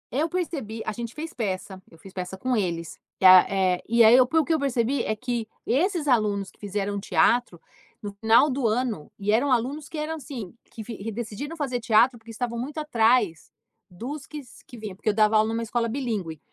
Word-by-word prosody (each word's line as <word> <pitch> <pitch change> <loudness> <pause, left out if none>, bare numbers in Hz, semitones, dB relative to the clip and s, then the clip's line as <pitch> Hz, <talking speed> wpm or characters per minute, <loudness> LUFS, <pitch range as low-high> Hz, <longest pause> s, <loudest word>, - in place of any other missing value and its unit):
Eu 310 +4 +1
percebi 285 - -4
a - - -1
gente 235 +1 -7
fez 320 +2 -6
peça. 190 -4 -4
Eu 165 - -18
fiz 190 +3 -14
peça 185 0 -5
com 255 +5 -1
eles. 170 -6 -3 0.2
E, - - 0
a 185 0 +9
eh, 185 -2 +1
e 235 0 +5
aí, 220 +1 +7
eu, 255 0 +6
pelo 320 +2 +2
que 330 - +1
eu 315 - +1
percebi, 265 -1 0
é 215 - -1
que 235 -1 -3 0.2
esses 320 - 0
alunos 210 -6 +1
que - - -30
fizeram 205 0 -3
teatro 230 -2 +1 0.4
no 205 - -5
final 225 +6 +5
do 260 -3 0
ano, 220 -7 -2
e 200 +1 -1
eram 255 +6 +2
alunos 265 +5 -1
que 320 - -7
eram, 305 +1 -2
assim, 250 - -8
que 225 - -10
vi 230 +1 -8
que 220 +3 -5
decidiram 240 +8 -6
fazer 265 -5 -2
teatro, 235 +2 +3
porque 225 +1 -17
estavam 235 +1 -4
muito 280 +6 -6
atrás 230 - +1 0.4
dos 260 +10 -7
que 305 - -8
s 255 -5 -15
que 245 - -12
vinha. 215 -4 -7
Porque 210 - -2
eu 205 - 0
dava 215 0 +3
aula 215 +1 +4
numa 230 +1 -2
escola 230 +1 -1
bilíngue. 220 - -3
230 Hz, 220 wpm, -25 LUFS, 205-260 Hz, 0.4 s, a